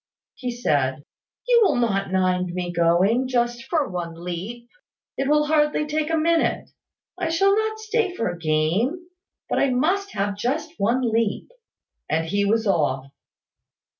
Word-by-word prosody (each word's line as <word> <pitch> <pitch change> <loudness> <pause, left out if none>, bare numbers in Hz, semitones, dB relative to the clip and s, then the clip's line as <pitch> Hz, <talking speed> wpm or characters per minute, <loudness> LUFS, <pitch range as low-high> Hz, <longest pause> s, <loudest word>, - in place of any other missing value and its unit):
He 250 0 -5
said 145 - 0 0.4
"You 480 -1 +5
will 300 - +3
not 195 -6 0
mind 185 -1 0
my 180 -1 -3
going, 180 +9 +2
just 240 -1 -1
for 315 -5 0
one 175 -2 -5
leap. 180 +8 -6 0.5
It 275 +1 -1
will 300 0 +4
hardly 300 0 +2
take 305 0 -1
a 325 - +1
minute. 330 +1 +1 0.5
I 345 -3 -1
shall 390 +4 +3
not 435 0 -1
stay 435 -3 -1
for 230 - -1
a 175 - -3
game. 175 - 0 0.4
But - - 0
I 275 - +3
must 355 +11 0
have 200 0 -1
just 290 +9 -2
one 235 +6 +2
leap." 225 - 0 0.6
And 160 +1 0
he 200 +5 0
was 225 +2 +1
off. 145 -9 +1
235 Hz, 155 wpm, -23 LUFS, -, 0.6 s, You